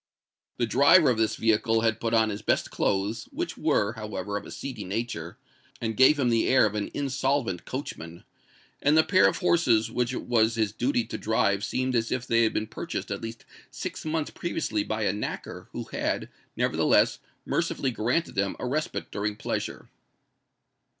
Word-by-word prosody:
The 120 - +1
driver 140 +5 +6
of 115 - -1
this 110 -1 +1
vehicle 115 0 +2
had 110 -1 +1
put 115 - -1
on 110 -1 +3
his 100 - -5
best - - 0
clothes, 105 +3 -1
which - - -4
were, 105 +2 +1
however, 105 -3 -5
of 100 - -4
a - - -10
seedy 130 -6 -6
nature, 100 -3 -4 0.4
and 110 -2 -2
gave 130 +5 +6
him 130 -4 +2
the 115 -1 +2
air 130 -3 +5
of 105 - -1
an 105 -1 -2
insolvent 135 -8 -1
coachman; 85 - -6 0.6
and 150 +2 +4
the 160 - +7
pair 185 +2 +5
of - - 0
horses 120 - +2
which 125 +1 0
it 130 - -4
was 115 -1 +2
his 110 -3 +1
duty 250 - 0
to - - -6
drive 100 -2 +1
seemed 130 +3 -1
as 115 -1 0
if 125 0 -1
they 115 -1 +3
had 110 - +2
been 110 - -1
purchased 110 - -5
at - - -3
least 115 0 -7 0.2
six - - -6
months 155 -1 -2
previously 150 -11 -2
by 110 +1 -2
a 100 - +1
knacker 105 - -5
who - - -5
had, - - -2 0.3
nevertheless, - - +3 0.3
mercifully 135 - 0
granted 125 +9 0
them 100 0 0
a - - -4
respite 150 +5 -2
during 105 0 -2
pleasure. - - -4
115 Hz, 185 wpm, -27 LUFS, 105-130 Hz, 0.6 s, the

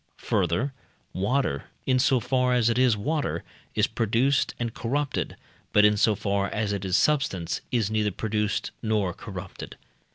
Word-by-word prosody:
Further, 90 - +1 0.4
water, 100 - 0 0.2
in 130 -1 +3
so 130 0 +4
far 125 +2 +1
as 120 -1 +3
it 120 - 0
is 125 -4 +4
water, 150 +8 -1 0.3
is 110 - +4
produced 115 +5 +1
and 120 -2 -3
corrupted; 140 +4 -2 0.4
but, 105 - +6
in 105 0 +5
so 105 +1 +3
far 100 -1 0
as 105 -1 -1
it 100 -1 -3
is 95 -1 +2
substance, 100 - +1
it 125 - +2
is 110 -2 0
neither 105 -1 +1
produced 105 +1 -1
nor 105 -5 0
corrupted. - - -8
110 Hz, 160 wpm, -26 LUFS, 100-125 Hz, 0.4 s, but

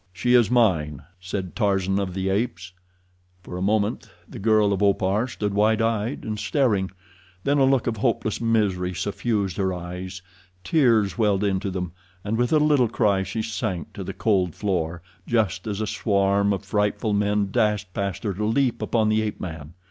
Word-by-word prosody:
"She 95 +7 0
is 120 -3 +5
mine," 85 - +2 0.2
said 95 -1 -5
Tarzan 95 -3 +1
of 95 -2 -3
the 95 0 -1
Apes. 95 -3 -2 0.7
For 90 - -8
a 90 - -4
moment 105 +2 0 0.2
the - - -9
girl 105 -1 +3
of 100 - -2
Opar 100 +3 +2
stood 105 -4 -3
wide 105 +2 +3
eyed 115 +3 -1
and 110 -1 -4
staring. 105 -11 +1 0.5
Then 145 +1 +2
a 135 - +5
look 135 -2 +2
of 115 -2 -1
hopeless 110 -1 0
misery 100 -6 +1
suffused 100 -1 -1
her 95 -1 +1
eyes—tears 95 - -1
welled 105 -2 +2
into 100 -1 0
them, 90 -2 -4 0.3
and 105 +2 -1
with 120 +1 +1
a 155 - +5
little 150 -6 +3
cry 100 -4 +2
she 95 +4 -3
sank 95 -6 -3
to - - -6
the - - -5
cold 95 -6 0
floor, 85 -4 -2 0.2
just 105 -5 0
as 105 -1 -3
a - - 0
swarm 100 -1 +1
of 100 0 -2
frightful 105 +2 0
men 100 -1 +1
dashed 105 -5 0
past 100 0 -3
her 105 -3 -1
to 105 +4 -4
leap 125 +2 +1
upon 110 -2 +1
the 110 0 +2
ape 110 -1 -3
man. 80 -2 -7
100 Hz, 180 wpm, -24 LUFS, 95-110 Hz, 0.7 s, is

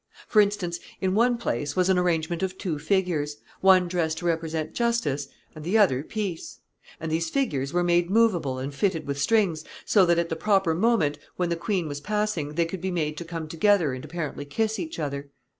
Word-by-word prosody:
For 215 - +5
instance, 200 -4 -1 0.2
in 190 -1 0
one 240 +3 +3
place 145 - -2
was 185 0 +2
an 190 -1 +3
arrangement 170 -1 0
of 190 0 -2
two 165 -7 -3
figures, 160 -5 0 0.2
one 185 -1 +5
dressed 165 -3 -1
to 175 - -6
represent 160 -2 -1
justice, 230 - 0 0.3
and 155 - -9
the 185 +7 +2
other 175 -12 +4
peace; 190 0 -5 0.4
and 160 0 -4
these 165 +1 0
figures 145 - -1
were 175 +1 +1
made 175 0 +2
movable 190 - +2
and 135 +2 -4
fitted 170 +2 0
with 140 0 -3
strings, 185 -4 +2 0.2
so 200 - +5
that, 170 0 +4
at 170 0 0
the 165 - -1
proper 195 -1 +2
moment, 165 -7 +2 0.2
when 180 -1 -1
the 170 - 0
queen 180 -1 -1
was 145 -1 -5
passing, 210 -7 -2
they 170 0 +2
could 165 +1 -6
be 190 - -1
made 155 -4 -1
to 170 - -5
come 165 -1 -5
together 165 -2 +2
and 130 - -6
apparently 155 -3 -5
kiss 220 +10 -1
each 325 -1 -5
other. 140 -1 -4
170 Hz, 205 wpm, -26 LUFS, 155-195 Hz, 0.4 s, For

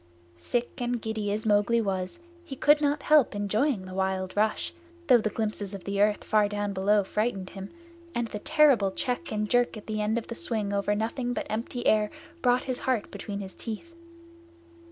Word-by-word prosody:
Sick 240 - -2
and 245 0 0
giddy 220 -2 -2
as 215 +2 -1
Mowgli 210 +2 +3
was 190 - -2 0.3
he 285 -6 -7
could 295 +3 +4
not 290 0 +1
help 300 -8 +4
enjoying 205 +2 0
the 185 - -8
wild 190 0 -1
rush, 215 +1 0 0.3
though 250 -5 +6
the 215 - 0
glimpses 210 -2 -3
of 195 - -10
earth 205 +1 +2
far 210 -1 +3
down 205 -1 -2
below 200 +2 +3
frightened 200 -2 -2
him, 195 0 -7 0.5
and 235 -1 0
the 210 - -5
terrible 275 -7 +4
check 250 - -3
and 210 0 -1
jerk 245 0 +2
at 210 - -10
the 215 -1 -2
end 215 +2 +1
of 230 - -3
the - - -6
swing 220 -8 -2
over 200 +1 +1
nothing 240 +3 -2
but - - -3
empty 230 +3 -3
air 215 -1 +4 0.3
brought 250 0 +3
his 255 -2 -3
heart 255 -5 -1
between 200 0 -5
his 190 -1 -8
teeth. 235 +10 -7
215 Hz, 190 wpm, -28 LUFS, 205-245 Hz, 0.5 s, though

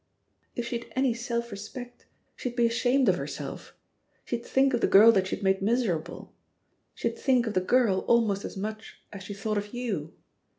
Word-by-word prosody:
"If 240 - -3
she'd 235 0 -5
any 260 -2 +2
self 235 0 -3
respect, 245 +5 -9 0.3
she'd 245 -1 -5
be 240 -1 +3
ashamed 245 +3 +2
of - - +4
herself; - - -7 0.5
she'd 235 -1 -3
think 270 0 +2
of 240 - +1
the - - +3
girl 215 +4 +8
that 190 -4 +1
she - - -2
had - - -11
made 190 0 +2
miserable; 205 -7 -1 0.6
she'd - - -3
think 255 -3 +2
of 220 - -3
the 185 - +2
girl 215 -1 +3
almost 215 -4 +2
as - - -7
much 215 +2 -6
as 200 - -8
she 200 +2 -7
thought 210 +1 -1
of 205 +3 -8
you. 205 -11 -3
230 Hz, 185 wpm, -27 LUFS, 200-245 Hz, 0.6 s, girl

